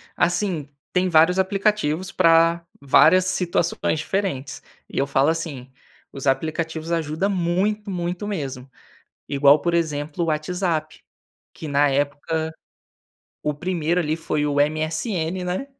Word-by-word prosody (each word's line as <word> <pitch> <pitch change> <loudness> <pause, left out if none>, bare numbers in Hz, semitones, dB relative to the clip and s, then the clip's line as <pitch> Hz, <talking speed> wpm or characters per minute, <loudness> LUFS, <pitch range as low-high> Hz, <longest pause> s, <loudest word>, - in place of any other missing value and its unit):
assim, 175 -4 0 0.2
tem 185 0 +2
vários 170 +3 +4
aplicativos 190 -3 0
pra 165 -1 +4 0.2
várias 180 +6 +5
situações 175 -3 0
diferentes 180 -6 -3 0.3
e - - -4
eu 140 - +1
falo, 140 +1 +2
assim, 145 -6 -4 0.4
os 135 0 -5
aplicativos 160 +3 -1
ajuda 160 +2 0
muito, 200 +3 0
muito 180 +2 -3
mesmo, 135 -9 -5 0.6
igual 140 +1 +5
por 170 +3 -1
exemplo 155 -1 -1
o - - -2
WhatsApp, 160 0 -2 0.5
que 160 - -8
na 145 0 +3
época, 145 +3 -1 0.9
o 150 - 0
primeiro 175 +2 -1
ali 155 -2 0
foi 155 -2 -2
o 145 -1 +2
MSN, 160 +4 -1
né? 180 +10 -3
165 Hz, 125 wpm, -22 LUFS, 150-180 Hz, 0.9 s, várias